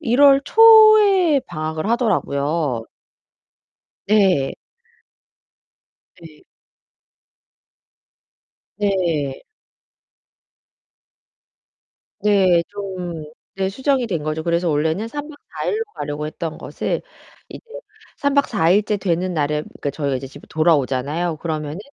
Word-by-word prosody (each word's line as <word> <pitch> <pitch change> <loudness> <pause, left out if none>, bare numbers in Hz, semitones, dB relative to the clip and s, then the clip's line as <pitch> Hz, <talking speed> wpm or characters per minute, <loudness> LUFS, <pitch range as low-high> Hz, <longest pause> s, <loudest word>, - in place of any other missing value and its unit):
1 250 -3 0
월 275 -1 +7
초에 430 -8 +6
방학을 155 +1 -4
하더라고요. 150 - -1 1.2
네. 190 -10 +2 1.7
네. 160 -2 -15 2.4
네. 170 -9 -1 2.8
네. 190 -5 +3
좀 185 -5 -6 0.4
네 190 0 0
수정이 265 +4 0
된 175 -8 -3
거죠. 155 +1 -3
그래서 170 +1 0
원래는 160 +8 -1
3 290 +5 -6
박 - - -10 0.2
4 - - -6
일로 440 +1 -1
가려고 145 +1 -4
했던 160 +1 -6
것을 - - -4 0.5
이제 - - -9 0.6
3 285 0 -1
박 280 - +3
4 195 -7 +1
일째 205 +3 +2
되는 185 -1 -1
날에 150 -1 -1
그러니까 145 - -6
저희가 140 -1 -2
이제 135 - -8
집에 140 +2 -14
돌아오잖아요. 155 +1 0
그러면은 155 0 -4
175 Hz, 190 characters per minute, -20 LUFS, 155-215 Hz, 2.8 s, 월